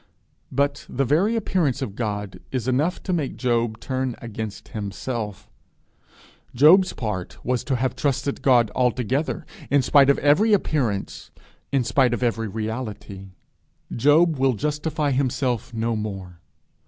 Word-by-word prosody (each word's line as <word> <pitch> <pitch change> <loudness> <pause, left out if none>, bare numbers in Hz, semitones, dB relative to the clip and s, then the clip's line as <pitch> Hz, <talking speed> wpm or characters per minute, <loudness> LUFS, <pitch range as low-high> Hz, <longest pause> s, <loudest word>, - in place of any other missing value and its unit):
But 140 +2 -1
the 135 +2 0
very 175 - +2
appearance 175 - 0
of 130 -8 -4
God 105 -3 -4
is 125 -2 -2
enough 145 +8 0
to 185 - -2
make 155 -6 -2
Job 120 -3 0
turn 130 -1 -2
against 110 -3 -7
himself: 105 0 -5 1.0
his 175 +9 +6
part 105 -6 -4
was 125 0 0
to 135 - 0
have 125 0 -1
trusted 140 0 -1
God 120 -5 +4
altogether, 130 - 0 0.2
in 140 -1 +3
spite 140 +1 +5
of 140 - +4
every 185 +10 +4
appearance, 130 - -1 0.4
in 135 -2 +2
spite 125 +1 +2
of 125 - -4
every 115 -2 0
reality! 110 -2 -5 0.7
He 130 +5 +2
will 145 -4 +4
justify 150 +3 -1
himself 130 -3 -1
no 115 0 -1
more. 95 -5 -6
125 Hz, 135 wpm, -23 LUFS, 110-145 Hz, 1.0 s, his